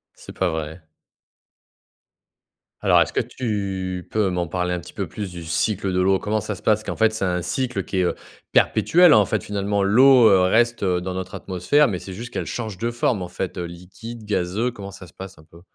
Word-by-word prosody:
C'est - - -12
pas 95 -2 +1
vrai? 80 +1 -5 2.0
Alors, - - +4
est-ce - - 0
que - - 0
tu 95 -6 -4
peux 105 -3 +1
m'en 90 -1 -1
parler 90 +1 -2
un 90 - -3
petit - - -12
peu - - -4
plus, 100 -4 -6
du 85 -1 -8
cycle 95 +5 -1
de 90 - 0
l'eau? 95 +1 +3
Comment 110 +1 -1
ça 105 - -4
se - - -11
passe, 110 0 +2
qu'en - - -4
fait, 110 -1 +3
c'est 110 -3 -2
un 90 -1 -1
cycle 125 +6 -2
qui 95 - -4
est, 95 - +3
heu, 90 - +1 0.4
perpétuel? 175 -6 +5
En 105 - +5
fait, - - -2
finalement, 100 0 -1
l'eau, 120 +3 +6
heu, 95 -2 +5
reste 115 +5 +2
dans 90 0 -1
notre 95 0 -5
atmosphère, 100 +11 +1
mais 95 - -2
c'est 95 +2 -8
juste 120 +5 -8
qu'elle - - -3
change 110 -6 -5
de 115 +4 -2
forme, 120 -4 0
en 90 - -7
fait, 95 +1 -5
heu, 90 - -3
liquide, 95 +7 -10
gazeux. 105 +3 -1
Comment 100 -5 -9
ça 90 -2 -12
se - - -19
passe, 95 -3 -10
un - - -16
peu? 85 +1 -18
95 Hz, 220 wpm, -22 LUFS, 90-110 Hz, 2.0 s, l'eau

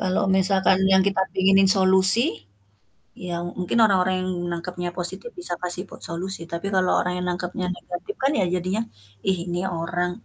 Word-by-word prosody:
Kalau 185 -2 0
misalkan 190 0 +3
yang 190 - +5
kita 195 -1 -1
pinginin 195 +1 +4
solusi, 190 +3 +6 1.0
ya 180 -1 -5 0.3
mungkin 180 +6 -1
orang-orang 185 -3 +2
yang 185 - -3 0.2
nangkepnya 175 +1 -5
positif 180 - -4
bisa 355 - -3
kasih 180 0 -2
po - - -12
solusi 180 +3 -4
tapi 170 +3 -4
kalau 185 -1 +2
orang 180 - -2
yang 180 - -3
nangkepnya 180 +1 -3
negatif 180 - -7
kan 270 - +3
ya - - +2
jadinya, 185 +4 -1 0.5
"ih 190 - +2
ni 175 - -1 0.2
orang" 175 +2 -2
185 Hz, 165 wpm, -23 LUFS, 180-190 Hz, 1.0 s, solusi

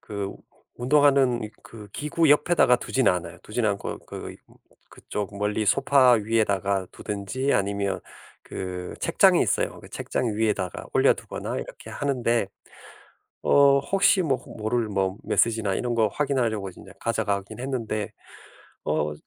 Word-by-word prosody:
...그 100 -2 -5 0.5
운동하는 135 -1 +3
이 105 - -7
그 105 -2 -12
기구 150 +1 +1
옆에다가 150 -3 +5
두진 130 +1 +1
않아요. 90 -2 -1
두진 110 +1 -1
않고 100 -2 -2
그 - - -7
이 - - -14 0.5
그쪽 100 -1 -6
멀리 105 +1 -1
소파 135 +2 +5
위에다가 100 -4 +1
두든지 105 +7 -2
아니면 100 -1 0 0.4
그 90 -1 -6
책장이 - - +4
있어요. - - -1
그 - - -13
책장 115 -4 -2
위에다가 105 -4 -1
올려 - - +5
두거나 - - -6
이렇게 - - -9
하는데. 120 -6 0 1.0
어 140 -1 +5
혹시 195 +4 +3
뭐 135 -6 +1 0.2
모를 110 +1 -1
뭐 95 -2 -1
메시지나 110 -4 +1
이런 120 +2 -2
거 110 -2 +4
확인하려고 115 -6 -1
인제 95 - -13
가져가긴 100 +2 -2
했는데. 115 -5 -3 0.7
어 75 0 0
110 Hz, 295 characters per minute, -25 LUFS, 100-130 Hz, 1.0 s, 옆에다가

